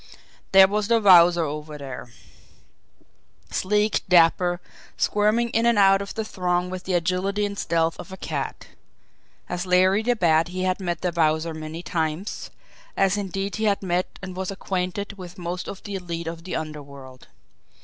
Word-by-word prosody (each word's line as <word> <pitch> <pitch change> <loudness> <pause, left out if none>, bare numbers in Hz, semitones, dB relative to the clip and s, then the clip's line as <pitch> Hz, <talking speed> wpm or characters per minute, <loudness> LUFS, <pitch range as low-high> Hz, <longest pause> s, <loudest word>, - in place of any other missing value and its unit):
There 195 0 +8
was 205 +1 -1
the 230 0 +4
Wowzer 175 -4 +6
over 150 0 -5
there 130 -3 -8 1.4
sleek, 210 +2 +1
dapper, 175 0 +4 0.4
squirming 215 +3 +2
in 230 +1 +1
and 235 -2 +3
out 195 -1 +5
of 200 - -7
the 220 - -2
throng 180 -3 -1
with 185 -1 -6
the 185 - 0
agility 185 +4 0
and 200 0 -4
stealth 165 -3 0
of - - -9
a 190 - -8
cat. - - -4 0.8
As 180 +1 -4
Larry 185 +3 +4
the 245 +2 +1
Bat 165 -5 +3
he 185 +1 -4
had 185 +1 0
met 175 -3 -3
the 180 - 0
Wowzer 160 0 +1
many 155 +2 -7
times, 160 +4 -3 0.5
as 195 0 +3
indeed 195 0 -3
he 220 - -1
had 200 -1 +1
met 180 0 -1
and 185 -1 -6
was 190 0 -3
acquainted 195 +1 -4
with 180 +1 -9
most 180 0 -5
of 195 - -8
the 205 - -7
elite 170 -3 -4
of 165 +1 -6
the 185 - -4
underworld. 140 -4 -8
180 Hz, 170 wpm, -24 LUFS, 165-200 Hz, 1.4 s, There